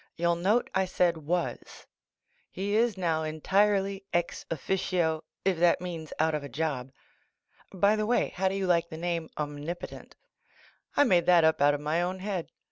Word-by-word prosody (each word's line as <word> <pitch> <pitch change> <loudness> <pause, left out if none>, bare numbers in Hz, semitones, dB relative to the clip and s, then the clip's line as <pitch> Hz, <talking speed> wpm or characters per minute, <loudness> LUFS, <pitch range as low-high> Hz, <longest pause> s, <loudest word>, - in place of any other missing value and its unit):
You'll 170 0 +1
nate 200 +8 +1
I 190 0 +2
said 180 -2 +1
"was 170 +3 -3 0.3
" - - -63 0.3
He 200 +2 -2
is 225 -2 +2
noM 165 -3 0
entirely 195 +5 +1
ex~officio 170 -1 -1 0.2
if 190 -4 +1
that 175 0 +4
means 170 -3 -6
out 160 0 +2
of 150 -1 -2
a 140 - -7
job. 140 -5 -3 0.8
By 200 +2 +3
the 215 0 -1
way. 245 - +2
how 190 +1 -1
do 190 - -1
you 195 -1 -1
like 170 -2 +2
the 160 - -7
name, 170 -1 -2
"Omnipotent?" 150 +3 -6 0.8
I - - +7
made 180 -9 +3
that 175 -2 +6
up 160 -2 +3
out 145 0 +5
of 145 - -6
my 155 +3 0
own 180 +2 -2
head. 190 -3 -4
175 Hz, 175 wpm, -28 LUFS, 160-190 Hz, 0.8 s, I